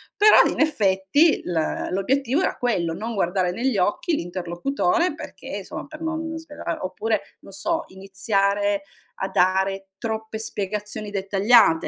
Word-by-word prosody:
però, 420 +1 +7
in - - -5
effetti, 220 - +3
l 165 -3 -1
l'obiettivo 265 - +1
era - - 0
quello, 180 -9 0
non 225 +5 -4
guardare 180 -2 +1
negli 240 +2 0
occhi 210 - +1
l'interlocutore 190 - -1
perché, - - -7
insomma, - - -7
per 310 +1 -11
non 320 0 -3
svela 295 - -5
oppure, 210 +4 -1 0.2
non - - -13
so, 325 - -1
iniziare 200 +1 0 0.3
a 190 - -3
dare 190 +1 +1
troppe 220 -1 -4
spiegazioni 210 0 -4
dettagliate 195 -1 +4
205 Hz, 130 wpm, -23 LUFS, 190-270 Hz, 0.3 s, però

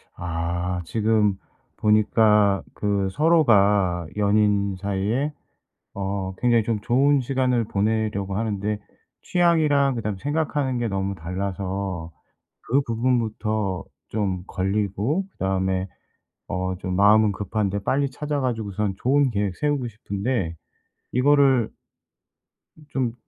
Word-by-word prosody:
아 85 +1 -2
지금 105 0 +2 0.4
보니까 105 -1 +3
그 100 -2 0
서로가 100 - +3
연인 100 -1 +2
사이에 100 +9 -1 0.6
어 95 -1 -3
굉장히 120 -2 +3
좀 110 -1 -1
좋은 135 +5 +3
시간을 125 -2 +1
보내려고 105 -2 -1
하는데 105 -1 -1 0.4
취향이랑 155 -6 +3
그다음에 105 -4 -3
생각하는 145 -3 -1
게 120 - -1
너무 95 -1 -2
달라서 95 0 -4 0.5
그 135 +4 +1
부분부터 110 -5 -1 0.3
좀 95 -4 -2
걸리고 105 - -1
그다음에 95 0 -1 0.6
어 95 +1 -2
좀 90 0 -4
마음은 105 +2 +5
급한데 100 0 -2
빨리 140 0 +1
찾아가지고선 115 -9 -2
좋은 135 0 +2
계획 100 -3 -1
세우고 145 -4 0
싶은데 100 -4 -3 0.6
이거를 135 -2 +4 1.2
좀 125 -5 -1
105 Hz, 240 characters per minute, -24 LUFS, 95-125 Hz, 1.2 s, 마음은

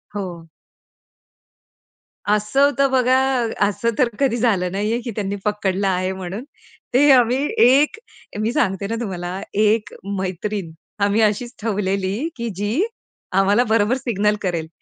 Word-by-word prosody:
हो. 175 -4 -6 1.8
असं 210 +5 +1
होतं 275 -1 +2
बघा, 255 0 +3 0.5
असं 230 +3 -1
तर 250 -2 +3
कधी 265 -4 +2
झालं 200 -7 +1
नाही 205 +3 -1
आहे 235 +1 -1
की 235 - -5
त्यांनी 200 -2 -2
पकडलं 200 -2 0
आहे 185 0 0
म्हणून. 190 +4 -6 0.5
ते 285 +4 +5
आम्ही 250 -1 +5 0.3
एक 280 - +4 0.4
मी 220 +2 0
सांगते 200 -8 0
ना 230 - -2
तुम्हाला 185 -2 -4
एक 215 +1 +2 0.3
मैत्रीण 190 -1 -3 0.3
आम्ही 205 +2 +2
अशीच 220 +4 0
ठेवलेली 200 +3 -1
की 235 -1 -4
जी, 210 - 0 0.5
आम्हाला 195 +5 +3
बरोबर 220 +3 +3
सिग्नल 210 -5 0
करेल, 170 -4 -2
210 Hz, 135 wpm, -21 LUFS, 195-240 Hz, 1.8 s, ते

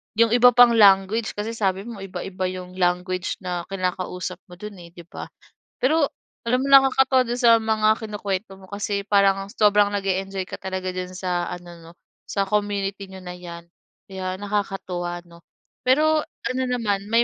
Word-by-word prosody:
'yong 230 0 +4
iba 245 0 +6
pang 245 -1 +8
language 205 +1 +4
kasi 210 +2 -3
sabi 195 -4 -1
mo 230 -3 -8
iba-iba 190 -1 -4
'yong 185 0 -7
language 180 +1 0
na 175 -1 -4
kinakausap 185 -1 -3
mo 180 - -12
do'n 190 -3 -10
eh, - - -16
'di 170 - -11
ba? - - -7 0.5
Pero 290 +2 +2 0.4
alam 250 +2 +2
mo, 275 - -2
nakakatuwa 265 -1 +6
don 240 +1 -2
sa 240 -2 +6
mga 220 -1 +1
kinukuwento 205 -2 -4
mo 190 - -14
kasi 200 0 -2
parang 195 -1 +3
sobrang 205 -1 +3
nag-e-enjoy 195 -1 -2
ka - - -6
talaga 190 -1 -4
diyan 185 0 -6
sa 180 -1 -2
ano, 175 0 -8
'no, 165 0 -14 0.4
sa 200 - 0
community 200 -1 -2
n'yo 190 -1 -11
na 180 - -7
'yan, 170 -1 -9 0.5
kaya 185 -1 -4
nakakatuwa, 190 -3 -3
'no? 170 -1 -17 0.5
Pero 310 +3 +4 0.3
ano 260 +1 -1
naman, 205 -5 -1
may 230 +1 +4
195 Hz, 165 wpm, -23 LUFS, 185-220 Hz, 0.5 s, pang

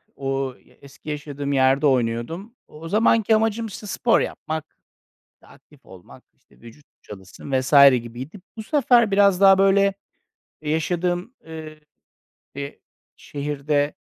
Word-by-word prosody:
o 135 -1 -3
y - - -24
eski 140 +2 -13
yaşadığım 145 -1 -4
yerde 135 +2 +3
oynuyordum. 130 - -2
O 150 - -15
o 165 0 -8
zamanki 220 +1 +3
amacım, 225 +1 0
işte, 210 +1 -9
spor 230 +4 +2
yapmak, 155 0 -5 0.8
aktif 145 -2 -21
olmak, 95 -2 -15
işte, - - -28
vücut 120 +6 -15 0.2
çalışsın 100 +6 -11
vs. 130 +2 -6 0.3
gibiydi. 130 - -9 0.2
Bu 220 - -6
sefer 240 -4 +3
biraz 200 -1 +3
daha, 195 -1 +7
böyle, 195 0 +3 0.7
yaşadığım, 175 +6 -2
eee, 155 -1 -10 0.8
e 140 0 -7 0.4
şehirde 145 0 -2
155 Hz, 125 wpm, -22 LUFS, 135-195 Hz, 0.8 s, daha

